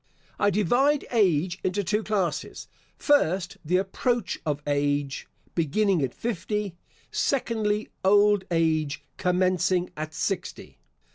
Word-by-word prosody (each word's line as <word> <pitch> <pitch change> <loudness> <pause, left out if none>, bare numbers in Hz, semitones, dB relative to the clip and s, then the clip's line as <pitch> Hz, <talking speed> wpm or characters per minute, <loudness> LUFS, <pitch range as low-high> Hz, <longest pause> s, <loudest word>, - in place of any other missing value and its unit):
I 205 - +4
divide 245 - +2
age 185 -5 +2
into 190 +2 0
two 210 +4 0
classes. 200 -6 -2 0.3
First, 190 - +2
the 175 +4 +2
approach 200 +3 -1
of 145 -1 0
age, 145 -1 -1 0.3
beginning 180 +3 +1
at 130 -3 -2
fifty. 210 -2 -3 0.4
Secondly, 220 -5 0
old 205 0 +5
age 155 -4 0
commencing 180 0 +1
at 155 0 -6
sixty. 190 -3 -4
185 Hz, 110 wpm, -26 LUFS, 165-210 Hz, 0.4 s, old